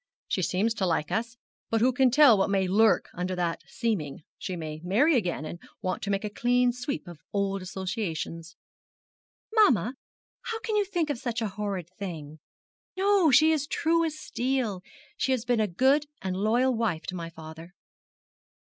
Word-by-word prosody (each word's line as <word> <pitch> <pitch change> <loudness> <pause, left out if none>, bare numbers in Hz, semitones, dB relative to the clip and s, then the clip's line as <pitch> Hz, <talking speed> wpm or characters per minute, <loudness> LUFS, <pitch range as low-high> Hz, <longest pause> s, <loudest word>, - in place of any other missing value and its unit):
She 185 - -1
seems 195 +6 +1
to 195 -5 -1
like 160 -3 0
us; 230 +1 -2 0.3
but 225 - +1
who 250 +3 +3
can 260 +1 +4
tell 265 -2 +7
what 195 -1 +1
may 195 -1 +1
lurk 210 +3 +3
under 180 +1 -3
that 175 -2 -1
seeming. 180 - -2 0.2
She 185 - -4
may 155 -2 -6
marry 250 - +3
again, 175 - -1
and 170 +2 -7 0.2
want 185 - -2
to 200 - -4
make 200 0 0
a 210 - -2
clean 245 +2 +2
sweep 250 -3 -4
of 170 -3 -10
old 195 -1 -1
associations.' 180 -3 -4 1.0
'Mamma! 255 - +4 0.5
How 455 -1 -4
can 445 -2 -2
you 415 -1 +3
think 345 -6 -1
of 245 - -4
such 240 -1 -2
a 220 -2 -1
horrid 195 -4 -4
thing? 160 -6 -6 0.6
No, 390 -3 +4
she 305 +4 +6
is 310 -2 +2
as 290 - -6
true 330 +2 +1
as 315 -2 -2
steel; 245 -9 -2 0.4
she 265 - +1
has 250 -2 -2
been 245 -2 +1
a 215 - +2
good 265 - +2
and 190 -1 -3
loyal 235 +6 +2
wife 215 -8 -1
to 185 - -5
my 170 -2 -5
father.' 160 +2 -11
215 Hz, 180 wpm, -27 LUFS, 180-260 Hz, 1.0 s, tell